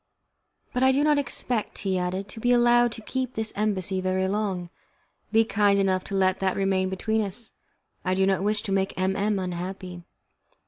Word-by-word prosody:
"But 250 - -1
I 260 0 +6
do 275 +2 +2
not 300 -1 +4
expect," 245 -5 -2
he 190 -1 +1
added, 185 +2 -2
"to 225 - -8
be 245 +2 +1
allowed 240 0 +4
to 225 - -8
keep 255 +1 -3
this 220 0 -2
embassy 195 -3 0
very 185 0 0
long. 190 -4 -2 0.6
Be 225 0 +4
kind 205 -2 +3
enough 190 -1 +1
to 195 - -4
let 190 -1 +2
that 190 -1 0
remain 190 -1 +1
between 220 +4 0
us. 210 +3 -3 0.5
I 185 0 0
do 190 0 +3
not 190 -1 +1
wish 210 +1 0
to 195 - -3
make 195 -1 0
M 190 +1 +1
M 205 +1 0
unhappy." 180 0 -5
195 Hz, 190 wpm, -26 LUFS, 185-220 Hz, 0.6 s, I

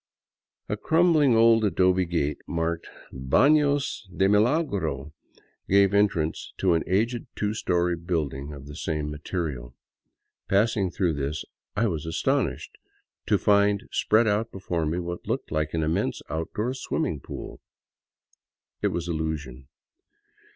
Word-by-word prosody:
A - - -2
crumbling 160 -6 +4
old 115 0 +5
adobe 95 -2 +3
gate, 80 -4 -1
marked 85 0 -2 0.2
'' - - -21
Bafios 140 - +2
de 95 +1 +1
Milagro," 105 - +1 0.6
gave 100 0 +5
en 105 +1 +5
trance 80 -4 -4
to 95 -3 +2
an 80 - +1
aged 115 +6 0
two 105 0 -1
story 90 -4 0
building 75 -5 -3
of 70 -2 -9
the 75 0 -9
same 75 -2 -3
material. 75 -6 -4 0.7
Passing 100 -1 +2
through 85 -1 0
this, 70 +1 -3 0.3
I 110 +3 +2
was 80 -7 -2
astonished 80 - -1 0.5
to - - +4
find 100 0 +3
spread 110 +2 +3
out 110 +2 0
before 85 -4 -2
me 80 +3 -1
what 85 0 -5
looked - - -3
like 75 0 -1
an 80 - 0
immense 80 +1 -1
outdoor 105 - -2
swimming 80 - -2
pool. - - -8 1.2
It - - +2
was 85 0 -3
illusion. 75 -6 -4
90 Hz, 135 wpm, -26 LUFS, 80-105 Hz, 1.2 s, old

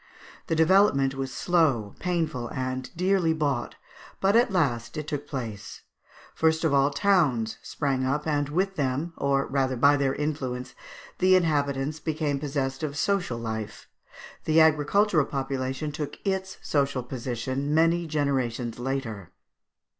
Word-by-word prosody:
The 165 - 0
development 160 -5 +4
was 135 -1 -4
slow, 140 - +1
painful, 160 -9 -1
and 130 +1 -4
dearly 180 -2 +2
bought, 140 -6 -1 0.4
but 195 +2 +3
at 240 +2 +5
last 120 -10 0
it 155 - -3
took 145 -1 -4
place; 115 -8 -6 0.5
first 160 0 +1
of 160 -3 +2
all 140 0 +4
towns 145 - +1
sprang 135 -3 -2
up, 140 +3 -1
and 145 -2 0
with 190 +5 -1
them, 145 +4 -1
or 140 0 +1
rather 135 -1 0
by 145 +4 +5
their 135 -1 0
influence, 130 -4 -3 0.5
the 185 0 +5
inhabitants 145 -3 0
became 150 -3 -1
possessed 135 -2 -2
of 150 -2 -3
social 180 -10 0
life. 110 -2 -5 0.6
The 160 +1 +4
agricultural 160 +2 +4
population 135 +1 -3
took 145 -1 -5
its 190 -1 -2
social 140 -3 0
position 130 +3 -3
many 165 +2 +3
generations 130 -6 -1
later. 120 -7 -4
140 Hz, 135 wpm, -26 LUFS, 130-160 Hz, 0.6 s, at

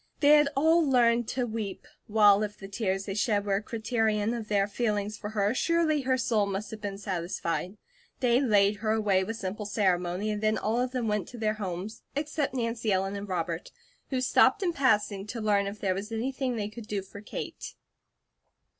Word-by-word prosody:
They 290 - +4
had 295 -1 +6
all 320 +4 +4
learned 240 -4 +3
to 250 +1 -1
weep; 215 -4 -5 0.2
while 210 -1 +5
if 210 -1 -3
the 195 - -9
tears 195 -1 -2
they 195 - -3
shed 205 -1 +1
were 195 -1 +1
a - - -2
criterion 220 -1 0
of 230 -3 -5
their 200 -1 +2
feelings 210 -1 -1
for 210 0 -6
her, 210 0 +1
surely 320 +1 +2
her 260 0 +1
soul 225 -5 +1
must 200 +2 -4
have 220 -1 -8
been 200 -1 -4
satisfied. 180 0 -3 0.4
They 245 0 +3
laid 205 -5 +3
her 215 +1 0
away 205 -4 +2
with 225 +4 -4
simple 205 +1 -4
ceremony 185 -1 0
and 210 0 -3
then 215 0 +2
all 225 +3 0
of 250 - 0
them 250 -3 -2
went 210 -4 -1
to 245 - -10
their 215 -1 0
homes, 195 0 -5
except 290 -1 -2
Nancy 230 -2 -1
Ellen 195 +1 0
and 200 0 -6
Robert, 170 -2 -3 0.4
who 260 -2 -1
stopped 260 +9 +4
in 350 -2 +1
passing 210 -8 +1
to 230 +2 -5
learn 205 -2 +2
if 205 +1 -6
there 190 -2 +1
was 200 +4 -5
anything 255 +2 -2
they 210 -2 -2
could 215 +1 -10
do 200 -3 -2
for 200 +1 -11
Kate. 210 - -7
215 Hz, 200 wpm, -28 LUFS, 200-240 Hz, 0.4 s, had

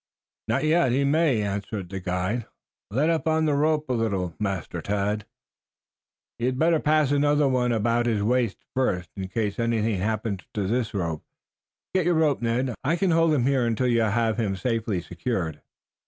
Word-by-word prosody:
"Not 115 +5 0
yet. 155 -4 +3
He 135 +3 +2
may," 140 -5 +2
answered 100 -1 -4
the 95 0 -4
guide. 95 +5 -2 0.4
"Let 140 +10 +2
up 165 -1 -1
on 160 0 +2
the 150 - +2
rope 150 +1 +1
a 130 - 0
little, 100 -7 -1
Master 95 -4 -3
Tad." 105 +3 -1 1.1
"You 120 - 0
had 130 0 -1
better 165 +2 +3
pass 150 -2 +2
another 145 0 +3
one 125 -2 +1
about 115 +1 +1
his 110 -3 +1
waist 120 -2 +1 0.2
first, 90 -10 -1
in 95 -1 -4
case 105 +1 -2
anything 115 -3 0
happens 105 -1 -2
to 105 -2 -1
this 115 +1 -1
rope. 85 -5 -2 0.7
Get 185 -3 +2
your 175 - +3
rope, 155 -5 +2
Ned. 120 +2 0
I 150 +5 +2
can 180 +1 +1
hold 165 0 +4
him 135 -5 +2
here 135 -2 +2
until 120 +2 0
you 120 -2 +3
have 110 +1 +1
him 100 -4 0
safely 110 -2 -1
secured." 85 - -3
115 Hz, 180 wpm, -25 LUFS, 100-140 Hz, 1.1 s, hold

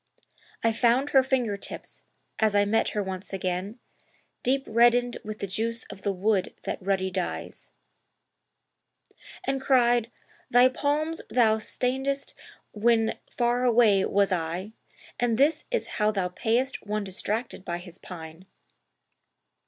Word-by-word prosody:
I 230 - +4
found 245 +5 +2
her 270 - +7
finger 250 -6 0
tips, - - -9 0.3
as 215 -2 +2
I 205 0 +4
met 220 +2 +2
her 205 - +1
once 190 0 -6
again, 185 +3 -3 0.6
Deep 270 +2 +1
reddened 240 +2 +3
with 215 0 -6
the - - -3
juice 230 +5 -2
of 195 -1 -11
the 200 - 0
wood 195 0 0
that - - -4
ruddy 190 0 0
dyes;[FN#290] 185 -1 -10 0.3
And 270 -5 -1
cried, 240 -3 +3 0.4
'Thy 245 +1 +6
palms 300 +5 -1
thou 225 -3 +4
stainedst 265 +5 -2 0.4
when 225 +1 +2
far 240 0 0
away 225 -5 +5
was 200 0 +2
I 175 +3 -2 0.5
And 235 -2 +1
this 300 +4 +3
is - - 0 0.2
how 210 - +4
thou 195 -4 -1
payest 235 +8 -1
one 210 0 -2
distracted 205 +3 -3
by 170 -1 -3
his 175 0 -10
pine!' 165 0 -10
220 Hz, 135 wpm, -27 LUFS, 195-245 Hz, 0.6 s, her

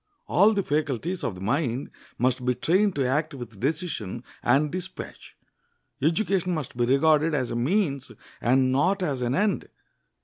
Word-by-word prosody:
All 205 +5 +4
the 200 - +1
faculties 150 +4 -1
of 100 - -2
the 90 - -10
mind 125 +4 -1 0.3
must 125 0 +1
be 125 0 +1
trained 185 - +2
to 135 -3 +1
act 150 +3 0
with 120 -6 -9
decision 135 - -2 0.2
and 140 +4 +2
dispatch. 185 +1 -7 0.6
Education 180 +3 +1
must 150 -7 -5
be 120 0 +1
regarded 155 +4 +3
as 130 -4 -1
a - - -2
means 140 - 0 0.3
and 130 +1 +3
not 180 +9 +2
as 140 -7 -1
an 125 +1 0
end. 205 +4 0
145 Hz, 160 wpm, -26 LUFS, 125-175 Hz, 0.6 s, All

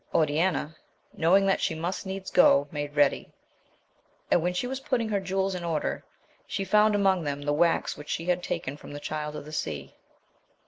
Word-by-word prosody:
Oriana, 155 0 +1 0.4
knowing 190 +4 +4
that 195 - +2
she 165 - 0
must 175 +4 -4
needs 190 0 -5
go, 145 -5 +5
made 145 -1 -4
ready; 145 -1 +2 1.0
and 175 - +4
when 175 +2 0
she 180 - -1
was 265 +1 -3
put 270 -1 0
ting 230 -2 -2
her 205 -2 +1
jewels 190 0 -1
in 180 -1 -5
order, 165 -3 -2 0.4
she 195 - -3
found 210 +2 +4
among 190 -3 +2
them 145 -1 -3
the 145 0 0
wax 170 +3 +2
which 150 - -11
she 165 - -2
had 180 0 +1
taken 140 -4 -4
from 145 - -11
the 145 - -6
Child 150 0 -4
of 150 - -7
the 155 - -10
Sea. 75 - -4
170 Hz, 195 wpm, -27 LUFS, 150-195 Hz, 1.0 s, go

